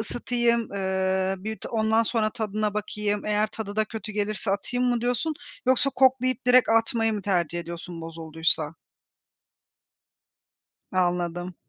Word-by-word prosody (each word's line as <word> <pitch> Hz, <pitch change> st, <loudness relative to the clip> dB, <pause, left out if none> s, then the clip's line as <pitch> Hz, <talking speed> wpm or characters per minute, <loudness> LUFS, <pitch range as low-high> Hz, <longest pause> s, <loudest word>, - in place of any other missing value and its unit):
"Isıtayım, 235 Hz, +1 st, +1 dB
ııı, 190 Hz, 0 st, 0 dB
bir 220 Hz, 0 st, -2 dB
de -, -, -6 dB
ondan 220 Hz, 0 st, +2 dB
sonra 220 Hz, -1 st, 0 dB
tadına 215 Hz, -2 st, -2 dB
bakayım, 210 Hz, 0 st, -2 dB
eğer 210 Hz, 0 st, +2 dB
tadı 215 Hz, -1 st, -7 dB
da 215 Hz, -, +3 dB
kötü 215 Hz, 0 st, -7 dB
gelirse 210 Hz, 0 st, -1 dB
atayım." 245 Hz, +5 st, 0 dB
mı 245 Hz, -1 st, +1 dB
diyorsun 245 Hz, +6 st, 0 dB, 0.3 s
yoksa 260 Hz, +1 st, +3 dB
koklayıp 255 Hz, -2 st, +2 dB
direkt 250 Hz, 0 st, +6 dB
atmayı 225 Hz, 0 st, +3 dB
mı 205 Hz, -2 st, -3 dB
tercih 175 Hz, -4 st, 0 dB
ediyorsun 170 Hz, 0 st, -7 dB
bozulduysa? 160 Hz, -1 st, -1 dB, 2.2 s
Anladım. 175 Hz, -1 st, 0 dB
215 Hz, 130 wpm, -26 LUFS, 185-235 Hz, 2.2 s, direkt